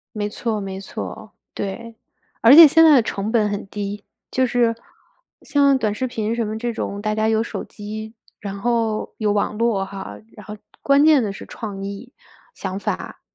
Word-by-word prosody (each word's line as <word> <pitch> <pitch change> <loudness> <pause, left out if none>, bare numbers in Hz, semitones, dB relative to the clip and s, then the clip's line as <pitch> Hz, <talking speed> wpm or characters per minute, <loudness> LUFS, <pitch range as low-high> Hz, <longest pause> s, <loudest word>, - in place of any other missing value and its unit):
没 205 -1 -1
错 220 0 -3
没 195 -1 -6
错， 215 +1 -8 0.2
对。 230 +3 -6 0.5
而 230 +3 +8
且 330 0 +12
现 325 +3 +5
在 320 - +8
的 255 - +6
成 210 -1 -3
本 220 -3 +2
很 205 0 -4
低， 205 0 -5 0.3
就 260 - +1
是 240 -2 +1 0.7
像 280 -2 +3
短 215 -5 -1
视 260 +5 -2
频 225 -2 -2
什 235 - -1
么 215 +1 -4
这 240 +1 -3
种， 200 -2 -4
大 215 0 -1
家 215 0 +1
有 220 0 +2
手 230 - -5
机， 215 +1 -8 0.3
然 200 -1 -6
后 230 -1 -1
有 215 -2 0
网 210 +1 -1
络 225 -4 +1
哈， 195 0 -8 0.2
然 210 - -13
后 210 +2 -8 0.2
关 280 +1 +4
键 305 -5 +5
的 205 - -2
是 195 - -9
创 205 -4 -7
意、 200 +5 -7 0.4
想 190 -1 -5
法， - - -5
220 Hz, 200 characters per minute, -21 LUFS, 205-235 Hz, 0.7 s, 且